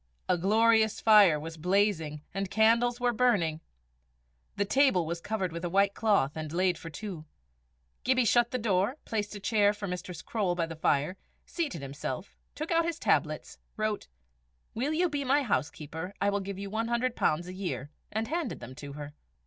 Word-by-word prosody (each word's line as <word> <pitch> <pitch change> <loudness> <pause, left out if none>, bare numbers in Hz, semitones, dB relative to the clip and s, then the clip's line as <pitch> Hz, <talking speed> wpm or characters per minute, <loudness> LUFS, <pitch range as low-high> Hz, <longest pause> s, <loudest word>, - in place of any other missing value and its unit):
A 180 - +3
glorious 220 +4 +3
fire 205 -8 +6
was 160 +2 -7
blazing 170 -4 +1
and 195 -1 -2
candles 230 +4 +3
were 245 -1 +1
burning. 200 -10 +2 0.9
The 200 - 0
table 260 - +3
was 170 +1 -4
covered 195 -4 -2
with 170 +1 -6
a 175 - -1
white 200 +2 +3
cloth, 205 -11 +2
and 155 -1 -5
laid 180 +1 +2
for 165 - -8
two. 165 -1 -7 0.8
Gibbie 255 -1 +3
shut 240 +2 +4
the 255 - -1
door, 215 +2 +1
placed 210 -1 -3
a - - -6
chair 205 0 +3
for 205 -1 -5
Mistress 180 -2 -6
Croale 200 -6 -1
by 170 -1 0
the 165 0 -7
fire, 155 +3 +1 0.3
seated 290 - -3
himself, 135 +4 -5 0.2
took 310 +3 -4
out 335 0 +4
his 335 -1 -2
tablets, - - 0 0.2
wrote 215 -1 -2 0.7
"Will 265 +6 -1
you 345 +3 +2
be 290 -3 -2
my 280 +2 +3
housekeeper? 160 - -3
I 200 0 +2
will 200 - 0
give 195 0 -5
you 200 0 -6
£100 230 -7 0
a 180 - -7
year," 145 -8 -4 0.2
and 220 +1 -2
handed 320 -5 -2
them 120 +1 -9
to 140 +2 -9
her. 145 0 -8
200 Hz, 180 wpm, -29 LUFS, 165-230 Hz, 0.9 s, fire